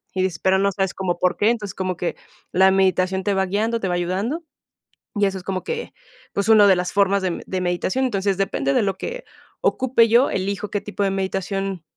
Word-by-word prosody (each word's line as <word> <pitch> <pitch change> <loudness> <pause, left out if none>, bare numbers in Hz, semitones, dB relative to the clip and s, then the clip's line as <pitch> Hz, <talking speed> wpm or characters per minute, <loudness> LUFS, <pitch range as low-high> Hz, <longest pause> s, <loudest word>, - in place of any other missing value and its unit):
y 185 - 0
dices 185 -4 -1
pero 190 0 +2
no 200 0 +2
sabes 195 -1 -1
cómo 180 -2 -2
por 180 0 +1
qué, 210 - +3
entonces, 215 -4 -2
como 185 -2 -2
que 175 - -2 0.4
la 190 +1 +5
meditación 190 0 +2
te 205 0 +1
va 190 0 +1
guiando, 220 +5 0
te 195 - -2
va 175 - 0
ayudando, 195 - -2 0.7
y 205 - +2
eso 195 -1 -1
es 180 - -9
como 185 -1 -3
que, 470 0 -5 0.4
pues, 200 +2 -1
una 210 -2 +7
de 190 - +6
las 180 0 -2
formas 200 0 +3
de 185 - +1
m 170 - -5
de 185 -1 -3
meditación, 180 +8 0
entonces, 195 -4 0
depende 140 -8 0
de - - +3
lo 195 -1 -1
que - - -5 0.4
ocupe 250 -3 +3
yo, 240 +4 +5
elijo 200 +2 -2
qué 205 - -2
tipo 205 -1 -3
de 195 - +1
meditación 195 -1 -3
195 Hz, 225 wpm, -22 LUFS, 185-205 Hz, 0.7 s, una